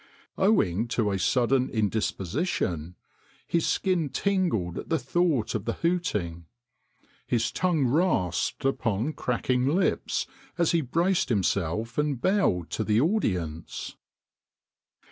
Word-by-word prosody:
Owing 115 Hz, -, +2 dB
to 105 Hz, -4 st, +2 dB
a 95 Hz, -, -1 dB
sudden 125 Hz, +6 st, +2 dB
indisposition 105 Hz, -, -1 dB, 0.5 s
his 170 Hz, -1 st, 0 dB
skin 180 Hz, -6 st, +1 dB
tingled 150 Hz, -, 0 dB
at -, -, -8 dB
the 165 Hz, -, +2 dB
thought 140 Hz, -2 st, 0 dB
of 110 Hz, -2 st, -3 dB
the 115 Hz, -, -1 dB
hooting. 105 Hz, -, -1 dB, 0.8 s
His 115 Hz, -1 st, +1 dB
tongue 170 Hz, -7 st, +1 dB
rasped 130 Hz, -, +1 dB
upon 125 Hz, 0 st, 0 dB
cracking 125 Hz, 0 st, 0 dB
lips 175 Hz, +7 st, +1 dB, 0.3 s
as 170 Hz, -2 st, +3 dB
he 170 Hz, -, +2 dB
braced 170 Hz, +7 st, +1 dB
himself 100 Hz, -, 0 dB
and 150 Hz, -4 st, 0 dB
bowed 160 Hz, -, +1 dB
to 110 Hz, -, -1 dB
the 105 Hz, 0 st, +2 dB
audience. 90 Hz, -, -1 dB
125 Hz, 115 wpm, -27 LUFS, -, 0.8 s, as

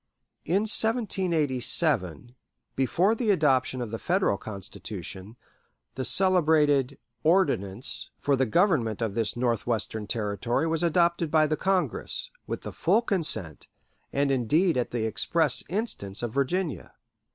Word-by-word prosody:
In 185 Hz, +5 st, +1 dB
1787 160 Hz, -, +1 dB, 0.4 s
before 175 Hz, -, +2 dB
the 230 Hz, -1 st, -2 dB
adoption 135 Hz, -8 st, +2 dB
of 115 Hz, -3 st, -5 dB
the 115 Hz, -, -4 dB
Federal 185 Hz, -, +1 dB
Constitution 100 Hz, 0 st, -8 dB, 0.6 s
the 130 Hz, -, -4 dB
celebrated 155 Hz, -7 st, +3 dB, 0.3 s
"Ordinance" 135 Hz, -, +1 dB
for 145 Hz, -, +1 dB
the 130 Hz, -1 st, 0 dB
government 120 Hz, -, +1 dB
of 110 Hz, -3 st, -2 dB
this 115 Hz, +1 st, -1 dB
Northwestern 115 Hz, -3 st, -1 dB
Territory 110 Hz, +6 st, -1 dB
was 165 Hz, -1 st, -1 dB
adopted 170 Hz, -1 st, +1 dB
by 155 Hz, 0 st, +3 dB
the 155 Hz, 0 st, 0 dB
Congress, 195 Hz, -, -1 dB, 0.2 s
with -, -, -5 dB
the -, -, -7 dB
full 235 Hz, -, +2 dB
consent, 155 Hz, -, -1 dB, 0.4 s
and 140 Hz, 0 st, +1 dB
indeed 150 Hz, -, +2 dB
at 125 Hz, -1 st, -1 dB
the 115 Hz, -2 st, -2 dB
express 150 Hz, +6 st, +1 dB
instance, 165 Hz, -, -4 dB
of 115 Hz, -2 st, -3 dB
Virginia. 140 Hz, -, -2 dB
140 Hz, 125 wpm, -26 LUFS, 115-175 Hz, 0.6 s, celebrated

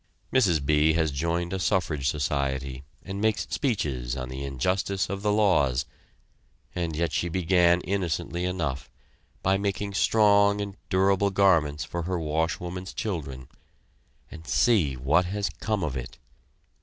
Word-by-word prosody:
Mrs. 90 Hz, -, +3 dB
B. 75 Hz, +2 st, +3 dB
has 80 Hz, -2 st, +1 dB
joined 85 Hz, +5 st, -2 dB
a 95 Hz, -, -2 dB
suffrage 80 Hz, -5 st, 0 dB
society 70 Hz, -2 st, -2 dB, 0.2 s
and 100 Hz, +1 st, -5 dB
makes 110 Hz, -1 st, +1 dB
speeches 70 Hz, -, -1 dB
on 65 Hz, -1 st, -5 dB
the 65 Hz, +2 st, -6 dB
injustice 90 Hz, +8 st, -1 dB
of 100 Hz, 0 st, -4 dB
the 105 Hz, 0 st, +1 dB
laws; 80 Hz, -12 st, +2 dB, 0.9 s
and 85 Hz, -3 st, -2 dB
yet 85 Hz, 0 st, 0 dB
she 85 Hz, -, -1 dB
began 85 Hz, 0 st, +3 dB
innocently 85 Hz, -2 st, -2 dB
enough, 80 Hz, -9 st, -3 dB, 0.5 s
by 95 Hz, +1 st, +2 dB
making 100 Hz, 0 st, -2 dB
strong 100 Hz, -1 st, +4 dB
and 100 Hz, -1 st, -4 dB
durable 95 Hz, +1 st, +3 dB
garments 85 Hz, -7 st, +2 dB
for 85 Hz, -, -4 dB
her 90 Hz, +2 st, -2 dB
washwoman's 85 Hz, +4 st, -2 dB
children 70 Hz, -, -4 dB, 0.8 s
and 80 Hz, +1 st, -11 dB
see 100 Hz, -, +3 dB
what 70 Hz, +8 st, +2 dB
has 100 Hz, 0 st, -2 dB
come 110 Hz, -4 st, -1 dB
of 75 Hz, -4 st, -2 dB
it! 65 Hz, -1 st, -6 dB
85 Hz, 140 wpm, -26 LUFS, 75-100 Hz, 0.9 s, strong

